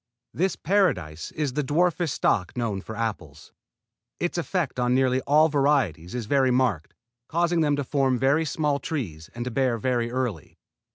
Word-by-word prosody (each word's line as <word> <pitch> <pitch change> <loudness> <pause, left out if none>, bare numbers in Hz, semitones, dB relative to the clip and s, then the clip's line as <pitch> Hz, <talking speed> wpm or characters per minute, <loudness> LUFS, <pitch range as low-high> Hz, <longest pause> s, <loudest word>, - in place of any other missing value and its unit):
This 185 0 0
Paradise 90 - 0
is 150 -4 -2
the 150 - 0
dwarfest 170 +4 +1
stock 90 -1 0
known 110 -5 -2
for 110 - -8
apples. 90 -9 -5 0.7
Its 175 - -2
effect 170 -6 -2
on 125 0 +2
nearly 130 0 +2
all 155 +2 +5
varieties 135 - +1
is 120 -3 -3
very 135 +2 +2
marked, 125 -11 0 0.3
causing 170 0 +1
them 145 -2 +2
to 145 - -2
form 135 -1 +1
very 140 +5 +2
small 150 -2 0
trees 90 - -5
and 120 0 -4
to 125 - -3
bear 125 -1 +1
very 120 0 0
early. 120 -9 -4
130 Hz, 165 wpm, -25 LUFS, 115-150 Hz, 0.7 s, all